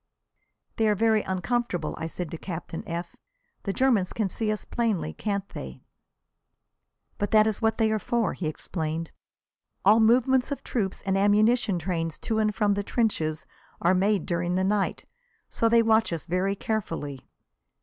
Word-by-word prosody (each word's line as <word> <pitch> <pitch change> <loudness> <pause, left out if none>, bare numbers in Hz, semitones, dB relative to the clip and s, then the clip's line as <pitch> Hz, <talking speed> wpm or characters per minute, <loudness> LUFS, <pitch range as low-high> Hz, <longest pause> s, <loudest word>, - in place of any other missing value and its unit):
"They 220 - +3
are 210 - +3
very 220 +1 +3
uncomfortable," 190 -3 -2
I 160 - -4
said 170 0 -5
to 165 - -5
Captain 170 -2 -6
F. 170 +1 -5 0.5
"The 200 - 0
Germans 225 -5 +2
can 215 -4 -1
see 215 +3 -1
us 215 - -4
plainly, 215 - -1
can't 200 - -3
they?" 65 -1 -8 1.4
"But 205 - 0
that 215 -1 +5
is 220 0 -1
what 225 0 +2
they 220 -1 +2
are 215 - +1
for," 235 +1 0
he 170 - -4
explained. 160 +1 -4 0.7
"All 210 +3 +7
movements 250 +4 +4
of 285 - -4
troops 200 -6 -2
and 195 -2 0
ammunition 210 +1 +3
trains 165 -2 -2
to 220 -1 -2
and 215 -1 +1
from 205 0 +2
the 200 - -1
trenches 165 -9 -1 0.3
are 175 +2 +3
made 195 0 +2
during 175 -1 -1
the 185 - +1
night, 200 +1 0 0.5
so 230 - +2
they 230 0 +5
watch 220 -2 +3
us 165 -3 -3
very 185 +3 0
carefully." 165 - -4
200 Hz, 165 wpm, -26 LUFS, 175-220 Hz, 1.4 s, All